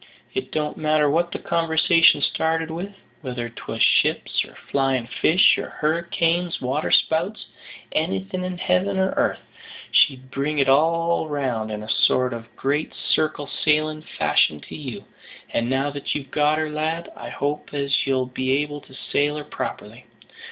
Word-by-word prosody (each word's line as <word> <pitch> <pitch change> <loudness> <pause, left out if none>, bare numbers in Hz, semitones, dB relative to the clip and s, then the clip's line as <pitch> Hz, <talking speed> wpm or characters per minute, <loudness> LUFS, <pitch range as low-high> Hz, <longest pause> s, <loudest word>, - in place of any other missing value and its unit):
It 390 - -3
don't 150 -1 -2
matter 155 -1 +2
what 170 +3 +1
the - - -3
conversation 165 -2 +3
started 160 0 0
with, 175 +5 -4 0.3
whether 125 -4 -4
'twas 115 - -3
ships, - - +2
or - - -14
flyin' 135 -3 0
fish, 160 +8 +4
or - - -5
hurricanes, 170 +2 0
waterspouts 160 +8 +1 0.5
anything 95 - -1
in 185 -1 -4
heaven 190 +2 +1
or 190 0 +1
airth, - - +1 0.5
she'd 130 -2 +3
bring 145 +3 -1
it 135 -2 +3
all 165 +4 +3
round 130 -7 -2
in 105 0 -5
a - - -9
sort 125 +2 +2
of 115 -1 -7
great 145 +5 -1
circle 155 -2 -1
sailing 155 +1 0
fashion 75 - +1
to - - -10
you. 130 -9 -7 0.5
And 115 +1 0
now 135 +2 0
that 140 -1 -3
you've 135 -3 -5
got 150 +1 +2
her, 155 -1 -1
lad, 160 +2 -2
I 120 - -8
hope 145 +4 -3
as 140 -1 0
you'll 130 -1 +1
be 130 +1 -1
able 145 0 -7
to 130 - -17 0.2
sail 145 +1 +2
her 150 - -5
properly. - - -6
150 Hz, 160 wpm, -23 LUFS, 130-160 Hz, 0.5 s, fish